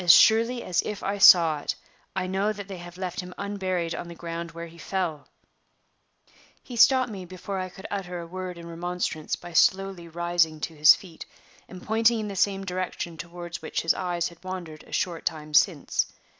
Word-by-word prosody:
As 175 - +8
surely 230 +6 +5
as 180 - +1
if 210 -2 -5
I 200 +1 -2
saw 165 -6 +8
it, - - -3 0.4
I 190 -1 -1
know 195 +3 0
that 205 -1 -8
they 190 -3 -7
have 175 0 -10
left 185 -1 -4
him 180 0 -6
unburied 185 -4 -2
on - - -5
the 170 - -9
ground 170 0 -5
where 170 0 -7
he 170 0 -14
fell!" 170 -4 -3 1.4
He 245 - -8
stopped 250 +1 +5
me 195 -3 -6
before 185 +2 -6
I 185 0 -3
could 190 +2 -13
utter 180 -3 -4
a 170 - -6
word 180 +1 -6
in 170 - -9
remonstrance 170 -2 -3
by 175 0 -11
slowly 190 0 +2
rising 170 -1 +1
to 165 - -3
his 150 +1 +8
feet, 175 -4 -11 0.4
and 180 -1 -11
pointing 225 +1 +3
in 210 -1 -3
the 200 - -6
same 195 0 +1
direction 180 -2 -3
toward 170 +1 -7
which 160 - -3
his 165 - +4
eyes 175 -2 -1
had 170 0 -18
wandered 180 -5 -6
a - - -17
short 170 -2 -1
time 155 -2 -4
since. 150 -1 +3
180 Hz, 200 wpm, -26 LUFS, 170-195 Hz, 1.4 s, As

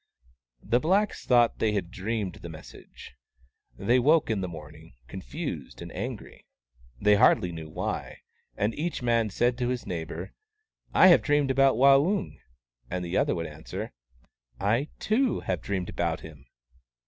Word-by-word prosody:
The 120 +3 +2
blacks 195 +8 0
thought 120 -2 +4
they 110 -1 +1
had 95 -4 -2
dreamed 100 -1 -3
the 85 - -8
mes 80 -1 -10
sage. - - -14 0.6
They 125 +2 +3
woke 150 0 +3
in 105 -3 -1
the 90 - -2
morning, 75 -3 -11
confused - - -6
and - - -9
angry, - - -7 0.5
they 105 0 +4
hardly 90 -2 +4
knew 80 -2 -8
why; - - -4 0.4
and 105 +3 0
each 165 -3 -3
man 115 -2 +2
said 120 +5 0
to 120 - 0
his 125 -1 -3
neighbour, 85 +1 -5 0.3
" - - -57 0.3
I 185 - +7
have 175 - +7
dreamed 145 -2 +2
about 135 -1 +4
Waung," 140 - +3 0.5
and 90 0 -3
the 85 +2 -4
other - - +2
would 85 - -3
answer, 80 0 -7 0.4
" - - -39
I, 135 +6 0
too, 245 +4 +1
have 90 -3 -2
dreamed 95 -3 -3
about 85 -2 -2
him." 70 -4 -13
105 Hz, 160 wpm, -27 LUFS, 85-135 Hz, 0.6 s, I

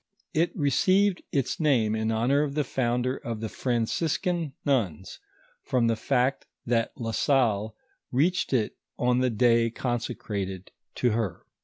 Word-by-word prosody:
It 165 +2 +2
received 185 +7 +3
its 135 -3 -1
name 125 -9 +2
in 110 0 -1
honor 120 +6 +2
of 145 -2 -2
the 150 - +2
founder 125 0 0
of 115 -2 -5
the 110 0 -4
Franciscan 155 - -1
nuns, 95 - -1 0.4
from 125 -3 +1
the 115 0 +2
fact 130 +3 0 0.2
that 115 -1 +1
La 115 -3 -3
Salle 110 -5 +1 0.4
reached 165 +9 +1
it 120 -5 +1 0.2
on 125 0 +2
the 130 0 +2
day 115 0 +3
consecrated 105 -6 -4 0.2
to 125 - +2
her. 105 -6 -2
125 Hz, 140 wpm, -27 LUFS, 110-140 Hz, 0.4 s, received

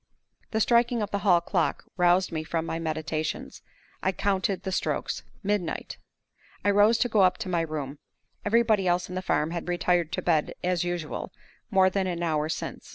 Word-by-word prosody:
The 220 - -1
striking 235 0 +3
of 205 - -5
the 200 - 0
hall 185 -3 +4
clock 170 -1 0
roused 180 +1 +3
me 160 -1 -2
from 165 +1 -2
my 165 - -3
meditations. 155 -1 -3 0.4
I 190 - +2
counted 195 0 0
the 190 - -3
strokes - - -1 0.2
midnight! 200 -4 -2 0.7
I 205 - +5
rose 205 +3 +5
to - - +2
go 215 -3 +3
up 185 -1 +4
to 225 -4 -5
my 170 -2 +1
room. 150 -3 -4 0.4
Everybody 215 -3 +3
else 175 0 +1
in - - -6
the 185 - -2
farm 155 -3 0
had 170 0 -4
retired 175 -2 +1
to - - -2
bed, 160 -4 +1
as 180 -1 +1
usual, 175 -3 -4 0.4
more 190 -2 +4
than 190 -1 0
an 175 -1 -2
hour 155 -2 0
since. - - -5
180 Hz, 185 wpm, -27 LUFS, 165-200 Hz, 0.7 s, I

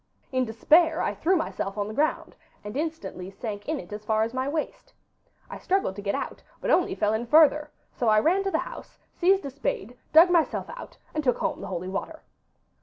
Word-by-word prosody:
In 255 -1 +1
despair 315 +9 +4
I - - 0
threw 370 +4 +1
myself 210 - -3
on 205 0 -1
the 215 - -6
ground, 300 +6 -1 0.3
and 210 +2 -7
instantly 310 - -4
sank 205 +1 -6
in 315 -2 -1
it 210 - -9
as 210 0 -6
far 220 0 +1
as 230 +2 -3
my 260 +1 -1
waist. 305 +1 -4 0.6
I - - -8
struggled 380 - 0
to 205 - -6
get 200 0 -1
out, - - -5 0.2
but - - -1
only 355 - +3
fell 210 0 +1
in 230 +2 -2
further; 300 +1 +5 0.2
so 240 - -2
I 215 -1 +5
ran 360 - +2
to - - +1
the - - +1
house, - - -7 0.2
seized 380 -1 +2
a 275 - -4
spade, 245 -4 -3 0.2
dug 330 +3 +7
myself 335 -3 +1
out, - - -10 0.2
and 310 - -2
took 250 -3 +2
home 320 -2 -2
the 200 - -6
holy 185 -1 -4
water. 200 +12 -5
260 Hz, 215 wpm, -26 LUFS, 210-320 Hz, 0.6 s, dug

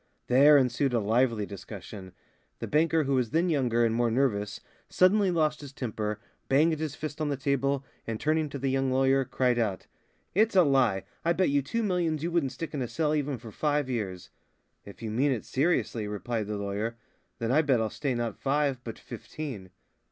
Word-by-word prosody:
There 140 +4 +6
ensued 130 0 +1
a - - +3
lively 115 0 +1
discussion. 100 -1 -9 0.4
The - - -5
banker 160 +1 +2
who 140 0 -1
was 125 -3 +1
then 170 +8 +1
younger 120 -6 +2
and 115 - +1
more 120 0 +2
nervous 110 -4 0 0.3
suddenly 195 +2 +4
lost 155 -3 +1
his 140 -2 -9
temper, 110 -5 -3 0.3
banged 155 +3 +3
his 155 -2 -3
fist 155 0 -6
on 150 - 0
the 140 - -1
table, 140 0 0 0.2
and 115 -1 -3
turning 155 0 +1
to 140 - -5
the 135 0 -1
young 135 0 +1
lawyer, 135 +1 +3
cried 125 -1 +1
out: 105 -5 -1 0.5
"It's 215 +2 +3
a 185 - +7
lie. 130 - +2 0.2
I 170 - +2
bet 185 -1 +2
you 140 0 +3
two 230 - -2
millions 170 -6 0
you 170 - -1
wouldn't 165 -6 +1
stick 155 +6 -6
in 145 - -2
a 125 - -1
cell 155 +4 0
even 145 -3 -1
for 115 -1 -11
five 145 +1 0
years." 95 -7 -4 0.5
"If 100 +3 -12
you 110 - -3
mean 135 +6 +2
it 120 -5 -2
seriously," 130 -7 0
replied 105 +1 -3
the 105 0 -3
lawyer, 100 +3 -3 0.4
"then 115 0 -2
I 150 +4 +5
bet 135 -6 +2
I'll 110 -1 -1
stay 140 -4 -2
not 120 -3 -3
five 140 -2 0
but 115 -3 -7
fifteen." 125 -12 -7
135 Hz, 200 wpm, -28 LUFS, 115-150 Hz, 0.5 s, a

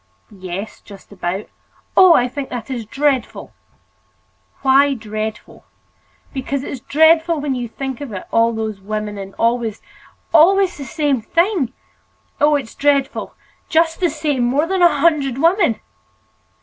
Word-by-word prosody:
"Yes, 190 +1 -7
just 200 -1 -15
about." 190 +1 -4 0.5
"Oh! 370 -3 +7
I 245 - +3
think 270 +2 -6
that 245 +1 -6
is 235 -4 -5
dreadful!" 275 0 -1 1.1
"Why 275 +1 +4
dreadful?" 215 -1 -6 0.7
"Because 270 0 -3
it's 275 - -6
dreadful 320 +4 +3
when 285 -2 -2
you 245 -2 -3
think 265 +3 -6
of 280 -5 -6
it—all 230 +4 0
those 220 -3 -4
women—and 205 -1 -5
always—always 305 - +1
the 280 - -7
same 285 -4 0
thing. 340 - 0 0.7
Oh! 295 0 +4
it's 265 -6 -4
dreadful, 280 -1 0 0.3
just 325 -1 +2
the 355 -2 +2
same—more 290 -2 0
than 375 +1 -1
a 345 -1 +4
hundred 285 -6 +2
women!" 335 - +2
270 Hz, 125 wpm, -19 LUFS, 220-310 Hz, 1.1 s, Oh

